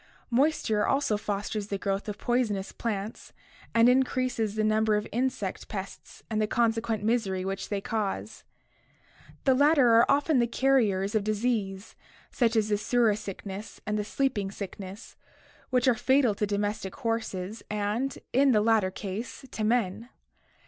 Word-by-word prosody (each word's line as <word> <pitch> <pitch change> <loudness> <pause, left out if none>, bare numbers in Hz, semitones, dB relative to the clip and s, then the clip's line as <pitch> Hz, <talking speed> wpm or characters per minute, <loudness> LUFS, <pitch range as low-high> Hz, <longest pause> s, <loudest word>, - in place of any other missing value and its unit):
Moisture 235 -5 +2
also 275 -6 +2
fosters 205 0 -3
the 200 - -2
growth 195 +1 -2
of 205 - -5
poisonous 220 -6 0
plants 215 -2 -5 0.4
and 230 +1 +6
increases 250 -4 +1
the 215 - +1
numbers 215 0 +3
of - - -9
insect 240 -5 -2
pests 195 -2 -8
and 215 -1 -1
the 215 - +1
consequent 225 -2 0
misery 205 -5 0
which 195 0 -4
they 205 - -1
cause. 210 -2 -3 1.0
The 265 - +4
latter 285 -1 +5
are 230 +1 +5
often 285 0 +3
the 235 - +3
carriers 225 -7 +2
of 215 -2 +1
disease 210 -2 -2 0.4
such 235 -2 +1
as 215 -1 +2
the 205 - +2
surra 230 0 +2
sickness 200 0 -7
and 210 - -1
the 210 - 0
sleeping 215 -3 -1
sickness, 195 +1 -8 0.5
which 250 0 +2
are 255 - +6
fatal 255 0 +3
to 210 +1 -1
domestic 205 -1 -2
horses 220 -3 -3
and, 210 +6 -1 0.2
in 270 0 +5
the 210 - +4
latter 220 -3 +3
case, 205 +7 -6
to 215 - -3
men. 225 0 0
215 Hz, 150 wpm, -28 LUFS, 205-245 Hz, 1.0 s, and